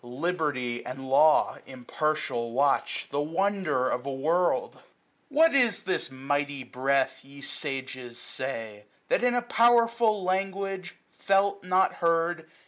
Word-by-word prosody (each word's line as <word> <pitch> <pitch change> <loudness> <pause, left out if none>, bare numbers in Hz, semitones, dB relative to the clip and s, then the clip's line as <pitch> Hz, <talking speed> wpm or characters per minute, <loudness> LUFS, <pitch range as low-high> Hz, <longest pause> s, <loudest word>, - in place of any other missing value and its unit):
Liberty 130 -3 -2
and 135 +1 -7
Law, 150 +3 +4
Impartial, 130 -2 -2
watch; 140 +2 +1
the 145 - 0
wonder 165 -4 0
of 125 - -2
a 140 - -4
world! 165 +7 0 0.5
845 280 - -15
What 325 0 +6
is 245 -6 +2
this 185 -9 -1
mighty 140 +1 -2
Breath, 135 +2 0
ye 140 +1 -14
sages, 130 -4 -5
say. 115 -6 -5 0.2
That, - - +2
in 245 0 +3
a 245 - +1
powerful 235 -3 +3
language, 190 0 -2 0.2
felt 200 0 +1
not 185 +1 +2
heard. 165 -1 +1
155 Hz, 130 wpm, -27 LUFS, 130-195 Hz, 0.5 s, What